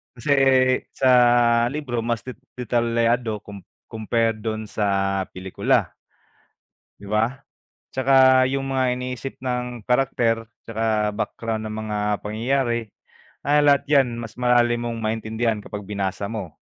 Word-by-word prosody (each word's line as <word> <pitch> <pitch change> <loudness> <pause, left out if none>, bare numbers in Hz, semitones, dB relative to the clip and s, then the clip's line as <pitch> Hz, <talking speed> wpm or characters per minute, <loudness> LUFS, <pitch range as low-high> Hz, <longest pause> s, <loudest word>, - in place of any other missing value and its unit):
Kasi 120 +4 -3 0.6
sa 130 -1 +1 0.6
libro 130 -5 -3
mas 115 0 -2
de 130 - -6 0.2
detalyado 115 -1 0
com 100 -2 -9 0.3
compared 115 0 0
dun 110 -1 -3
sa 95 -2 0
pelikula. 95 0 0 1.1
Di 100 - -11
ba? 110 +3 +1 0.6
Tsaka 130 -1 +5
yung 135 0 -2
mga 130 -2 +1
iniisip 125 +1 -6
ng 125 -2 -3
karakter 115 -3 +1 0.2
tsaka 110 -1 0
background 110 +1 -4
ng 110 - -5
mga 105 -1 -3 0.2
pangyayari, 120 +2 -1 0.6
ah, 145 +1 +3
lahat 140 -1 +4
yan 130 -5 +3
mas 115 0 -9
malalim 120 -1 +3
mong 115 -1 -4
maintindihan 110 0 -1
kapag 105 -1 -7
binasa 100 -1 -3
mo, 95 -9 -6
115 Hz, 120 wpm, -23 LUFS, 110-125 Hz, 1.1 s, Tsaka